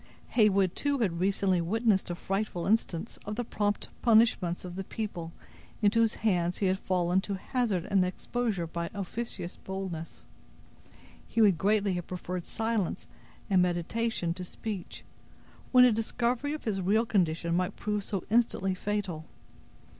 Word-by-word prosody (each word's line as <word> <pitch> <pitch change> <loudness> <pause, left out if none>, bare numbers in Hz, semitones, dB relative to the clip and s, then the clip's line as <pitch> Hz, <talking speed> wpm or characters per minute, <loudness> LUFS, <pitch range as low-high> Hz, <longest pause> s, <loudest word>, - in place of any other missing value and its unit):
Heyward 200 -5 +4
had - - -27
too 285 -1 +1
recently 190 -3 +1
witnessed 210 +2 +1
a 175 - -2
frightful 195 -1 -2
instance 195 -5 0
of 210 +1 -4
the 245 - -1
prompt 205 -2 -1
punishments 220 -7 +3
of 180 -1 -7
the 195 - -3
people 185 -6 -5 0.5
into 215 +1 +3
whose 225 -1 +3
hands 180 -5 +1
he 200 - 0
had 190 0 +2
fallen 180 0 +1
to 200 0 -3
hazard 200 -3 -1
an 195 -2 +3
exposure 195 0 -2
by 170 +1 -3
any - - -13
officious 200 -2 -4
boldness. 190 -4 -6 1.0
He 230 - -2
would 200 -7 +5
greatly 200 0 +2
have 175 -1 -4
preferred 180 -1 -5
silence 225 -4 -1 0.4
and 190 -3 +4
meditation 180 +1 0
to 180 - -6
speech, 195 0 -6 0.7
when 250 -1 +8
a 250 - +6
discovery 235 +5 0
of 305 - -6
his 200 -4 -1
real 215 +5 +3
condition 170 -5 +1
might 180 +2 0
prove 210 -1 -2
so 195 -3 -3
instantly 225 -5 +2
fatal. 185 -5 -3
195 Hz, 155 wpm, -29 LUFS, 180-220 Hz, 1.0 s, when